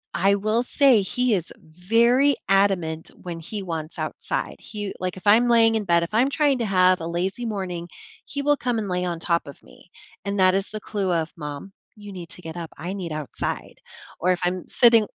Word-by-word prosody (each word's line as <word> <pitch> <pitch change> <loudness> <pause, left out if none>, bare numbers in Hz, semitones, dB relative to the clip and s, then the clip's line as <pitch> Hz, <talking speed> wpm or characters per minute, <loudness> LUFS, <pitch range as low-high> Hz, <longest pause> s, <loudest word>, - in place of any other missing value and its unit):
I 195 +3 +3
will 215 +4 0
say 255 -3 +4
he 245 +4 0
is 175 -3 -3
very 230 - +2
adamant 185 -5 +1
when 170 -2 -6
he 200 +5 -6
wants 165 -3 -5
outside, - - -3
he 205 -2 -6
like 185 0 -3
if 185 - -8
I'm 235 +4 +6
laying 225 -1 +5
in 220 - 0
bed, 170 -2 +3
if 170 - -6
I'm 250 +5 +3
trying 285 -2 +2
to 230 - 0
have 185 -2 +3
a 165 - -4
lazy 190 +7 -2
morning, 185 -5 -4 0.4
he 285 - -4
will 290 +1 +3
come 245 -2 -1
and 205 - -3
lay 180 0 -1
on 170 -2 -3
top 170 0 0
of 140 - -11
me, 180 - -19 0.3
and 200 0 -2
that 185 0 +5
is 195 +1 -1
the 215 - -6
clue 200 -3 -2
of, 165 -1 0
"Mom, 150 +4 -7 0.3
you 205 -1 -10
need 175 -3 -8
to 180 - -5
get 160 -1 -8
up. 165 -2 -6
I 175 +6 -5
need 180 -5 -5
outside." 150 -2 -5 0.4
Or 185 +1 +2
if 180 - 0
I'm 180 0 -1
sitting 230 -3 +5
190 Hz, 215 wpm, -24 LUFS, 175-220 Hz, 0.4 s, I'm